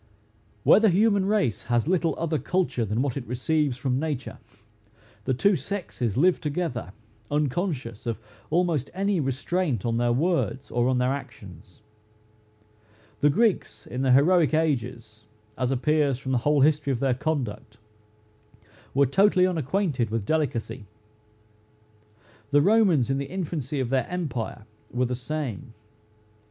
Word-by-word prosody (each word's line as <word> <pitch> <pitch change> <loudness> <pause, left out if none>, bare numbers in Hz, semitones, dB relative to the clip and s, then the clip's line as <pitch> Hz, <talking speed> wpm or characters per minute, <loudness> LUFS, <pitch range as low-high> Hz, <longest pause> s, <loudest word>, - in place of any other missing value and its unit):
Where - - +7
the 220 -1 +4
human 200 +1 +3
race 165 - 0
has 120 +3 +1
little 170 -2 +1
other 160 -2 -1
culture 175 -6 0
than 110 +5 -1
what 140 -4 -2
it 130 -3 -5
receives 135 +2 0
from 130 0 -1
nature, 145 -4 -4 0.9
the 130 - +1
two 200 +10 +3
sexes 140 - -3
live 175 +5 +3
together, 145 - -3 0.4
unconscious 145 - -2
of 115 - -1 0.3
almost 165 -5 +1
any 195 -1 0
restraint 140 - -1
on 115 -1 0
their 120 0 +1
words 145 -1 0
or 120 0 +1
on 130 - +1
their 125 +1 +1
actions. 100 - -10 1.4
The 145 - +4
Greeks, 160 - 0
in 125 - -5
the 135 -1 +2
heroic 160 +4 +4
ages, 120 -8 -2 0.3
as 125 -1 -1
appears 140 +1 +1
from 130 0 -5
the 125 - +2
whole 145 +3 +2
history 145 -1 +3
of 125 - -1
their 135 -1 +2
conduct, 125 -7 -3 1.2
were 140 0 +5
totally 185 +6 +4
unacquainted 160 - 0
with 110 -2 -2
delicacy. 130 -6 -2 1.6
The 145 +1 +4
Romans 185 - +3
in 135 - 0
the 140 - -5
infancy 160 -6 -3
of 130 -3 -1
their 130 -2 0
empire, 130 - -4 0.3
were 125 +1 0
the 125 - -2
same. 130 -3 -5
140 Hz, 140 wpm, -25 LUFS, 120-165 Hz, 1.6 s, Where